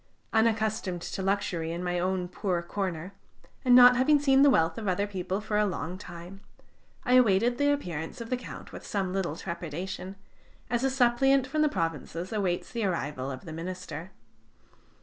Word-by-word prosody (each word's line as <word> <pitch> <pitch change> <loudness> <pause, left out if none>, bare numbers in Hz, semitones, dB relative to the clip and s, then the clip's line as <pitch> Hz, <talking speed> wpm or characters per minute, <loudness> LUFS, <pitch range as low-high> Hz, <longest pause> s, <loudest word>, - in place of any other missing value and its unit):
Unaccustomed 220 -4 +1
to - - -4
luxury 190 -4 -1
in 170 +2 -4
my 180 0 -1
own 185 0 -1
poor 180 -2 -2
corner, 185 -1 -4 0.5
and 250 -2 +6
not 250 0 +9
having 285 +4 +4
seen 270 -1 +4
the 285 - +7
wealth 165 -8 +2
of 215 - -5
other 190 +2 +1
people 190 -1 -3
for 210 0 -1
a 210 - +3
long 180 -2 -4
time, 180 0 -10 0.6
I 250 - +2
awaited 240 0 +4
the 285 0 +4
appearance 175 - -3
of 230 +1 -7
the - - +3
Count 250 - -9
with - - -9
some 190 -3 -2
little 185 -6 -1
trepidation, 175 +2 -5 0.6
as 240 +1 +1
a 270 - +3
suppliant 265 +1 +3
from 305 +4 -1
the 305 - +4
provinces 165 - -3
awaits 190 -5 -1
the 235 -2 -2
arrival 145 -8 -2
of 130 -1 -7
the 160 - -7
minister. 175 0 -6
195 Hz, 175 wpm, -28 LUFS, 175-240 Hz, 0.6 s, not